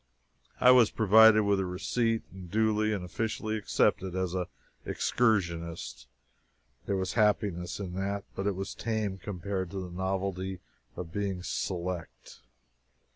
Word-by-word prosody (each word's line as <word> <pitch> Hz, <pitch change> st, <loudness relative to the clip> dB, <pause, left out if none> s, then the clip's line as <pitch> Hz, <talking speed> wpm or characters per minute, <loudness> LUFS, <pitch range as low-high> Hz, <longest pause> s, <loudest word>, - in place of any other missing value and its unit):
I 125 Hz, -, +7 dB
was 125 Hz, -4 st, +6 dB
provided 110 Hz, 0 st, +6 dB
with 100 Hz, -1 st, +2 dB
a 95 Hz, -, 0 dB
receipt 115 Hz, +5 st, 0 dB
and 95 Hz, -2 st, -10 dB
duly 110 Hz, +1 st, +2 dB
and 100 Hz, -4 st, -2 dB
officially 110 Hz, +3 st, -2 dB
accepted 95 Hz, -3 st, +1 dB
as 95 Hz, -1 st, -1 dB
an 90 Hz, -1 st, -2 dB, 0.4 s
excursionist. 85 Hz, -, -1 dB, 0.8 s
There 100 Hz, -, +1 dB
was 95 Hz, -1 st, -2 dB
happiness 100 Hz, -5 st, +1 dB
in 95 Hz, -3 st, -5 dB
that 100 Hz, +1 st, -2 dB
but 95 Hz, -, -3 dB
it 100 Hz, -, 0 dB
was 95 Hz, +1 st, -4 dB
tame 110 Hz, -4 st, -2 dB
compared 95 Hz, -1 st, -4 dB
to 100 Hz, -, -5 dB
the 90 Hz, -2 st, -7 dB
novelty 95 Hz, 0 st, -2 dB, 0.4 s
of 85 Hz, -2 st, -6 dB
being 100 Hz, -3 st, -2 dB
"select." 90 Hz, -9 st, -4 dB
95 Hz, 135 wpm, -29 LUFS, 90-105 Hz, 0.8 s, I